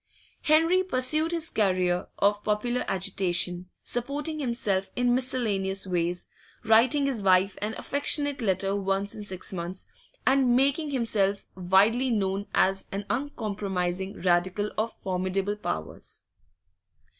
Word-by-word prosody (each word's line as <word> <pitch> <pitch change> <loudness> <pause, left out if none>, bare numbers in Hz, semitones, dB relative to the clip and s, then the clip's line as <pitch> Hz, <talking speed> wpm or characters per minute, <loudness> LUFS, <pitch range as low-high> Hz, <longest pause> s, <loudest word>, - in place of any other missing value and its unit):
Henry 325 +4 +4
pursued 310 -1 0
his 330 -1 0
career 185 -3 +1
of 205 +1 +2
popular 240 +4 0
agitation, 180 -1 0
supporting 285 +6 -3
himself 215 -7 -1
in 245 0 +2
miscellaneous 215 -7 0
ways, 175 -1 -1 0.4
writing 235 +6 +4
his 265 -6 -1
wife 190 0 +3
an 215 +2 -2
affectionate 285 0 0
letter 195 -1 0
once 195 0 -1
in 215 - -8
six 190 -2 -4
months, 180 +1 -5 0.4
and 260 -2 +4
making 280 +4 +2
himself 215 -7 0
widely 200 +8 +3
known 200 -3 -1
as 195 0 +2
an 200 +1 -4
uncompromising 195 -8 -3
Radical 185 +3 +1
of 220 +2 -1
formidable 190 +2 -2
powers. 80 - -6
205 Hz, 120 wpm, -27 LUFS, 190-255 Hz, 0.4 s, Henry